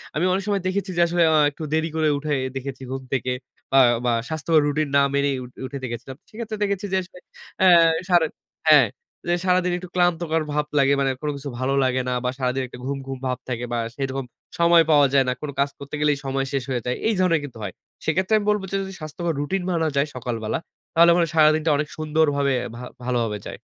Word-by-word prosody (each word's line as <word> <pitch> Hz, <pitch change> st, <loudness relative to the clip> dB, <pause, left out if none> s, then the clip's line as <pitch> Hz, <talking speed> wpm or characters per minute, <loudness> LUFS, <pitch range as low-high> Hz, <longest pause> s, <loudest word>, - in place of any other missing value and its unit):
আমি 160 Hz, +4 st, +1 dB
অনেক 195 Hz, +1 st, -1 dB
সময় 200 Hz, -2 st, +1 dB
দেখেছি 195 Hz, +1 st, -2 dB
যে -, -, +4 dB
আসলে 175 Hz, 0 st, +2 dB
আ -, -, +5 dB
একটু 150 Hz, -, -9 dB
দেরি 160 Hz, +1 st, +1 dB
করে 160 Hz, -1 st, +2 dB
উঠে 150 Hz, +1 st, -2 dB, 0.2 s
দেখেছি 135 Hz, 0 st, -5 dB
ঘুম 135 Hz, 0 st, -4 dB
থেকে 130 Hz, -1 st, 0 dB, 0.5 s
আ -, -, +9 dB, 0.3 s
বা 120 Hz, -, +3 dB, 0.2 s
স্বাস্থ্যকর 160 Hz, 0 st, +2 dB
রুটিন 150 Hz, +1 st, 0 dB
না 140 Hz, -, +6 dB
মেনেই 140 Hz, -1 st, +1 dB
উঠ 125 Hz, -, -10 dB, 0.2 s
উঠে 140 Hz, +2 st, -6 dB
দেখেছিলাম। 125 Hz, +2 st, -6 dB
সেক্ষেত্রে 220 Hz, -1 st, -6 dB
দেখেছি 200 Hz, 0 st, -1 dB
যে -, -, +3 dB
আসলে 180 Hz, 0 st, -13 dB, 0.4 s
অ্যা 190 Hz, -, +5 dB, 0.4 s
সারা 175 Hz, -2 st, +5 dB, 0.4 s
হ্যাঁ। -, -, +7 dB, 0.4 s
যে 175 Hz, -, +3 dB
সারাদিন 180 Hz, -1 st, +2 dB
একটু 180 Hz, 0 st, -9 dB
ক্লান্তকর 170 Hz, -2 st, +1 dB
ভাব 150 Hz, 0 st, 0 dB
লাগে 140 Hz, 0 st, +4 dB
মানে 135 Hz, -1 st, +2 dB
কোন 150 Hz, -, -2 dB
কিছু 140 Hz, +1 st, -6 dB
ভালো 130 Hz, +1 st, 0 dB
লাগে 130 Hz, 0 st, +1 dB
না। -, -, 0 dB
বা 125 Hz, -, +1 dB
সারাদিন 130 Hz, 0 st, -1 dB
একটা -, -, -11 dB
ঘুম, 140 Hz, +1 st, -2 dB
ঘুম 135 Hz, 0 st, -4 dB
ভাব 125 Hz, -1 st, -1 dB
থাকে 125 Hz, -1 st, -2 dB
বা 120 Hz, -, 0 dB, 0.2 s
সেরকম 135 Hz, -1 st, -3 dB, 0.3 s
সময় 170 Hz, 0 st, +6 dB
পাওয়া 145 Hz, -2 st, +6 dB
যায় 135 Hz, -1 st, +4 dB
না। 125 Hz, -, +1 dB
কোন 150 Hz, -, -4 dB
কাজ 140 Hz, +1 st, +3 dB
করতে 140 Hz, +1 st, -7 dB
গেলেই 150 Hz, -1 st, +3 dB
সময় 135 Hz, 0 st, -1 dB
শেষ 135 Hz, -2 st, 0 dB
হয়ে 125 Hz, -2 st, -1 dB
যায়, 125 Hz, 0 st, -1 dB
এই 225 Hz, -, +2 dB
ধরনের 180 Hz, -3 st, +3 dB
কিন্তু 130 Hz, -5 st, -8 dB
হয়। 95 Hz, -3 st, -5 dB, 0.3 s
সেক্ষেত্রে 190 Hz, +3 st, +1 dB
আমি 210 Hz, -, -2 dB
বলব 210 Hz, -1 st, +2 dB
যে -, -, -1 dB
যদি 190 Hz, 0 st, -7 dB
স্বাস্থ্যকর 165 Hz, +2 st, -3 dB
রুটিন 185 Hz, +6 st, -2 dB
মানা 165 Hz, -2 st, +1 dB
যায় 140 Hz, +2 st, +2 dB
সকালবেলা, 115 Hz, -3 st, -3 dB, 0.3 s
তাহলে 170 Hz, +1 st, +6 dB
মনে 175 Hz, -, +3 dB
হয় -, -, -8 dB
সারাদিনটা 155 Hz, 0 st, +4 dB
অনেক 150 Hz, +1 st, -1 dB
সুন্দরভাবে 150 Hz, -3 st, +1 dB, 0.2 s
ভা 120 Hz, -, -8 dB, 0.2 s
ভালোভাবে 120 Hz, -4 st, 0 dB
যায়। -, -, -7 dB
150 Hz, 220 wpm, -23 LUFS, 135-170 Hz, 0.5 s, আ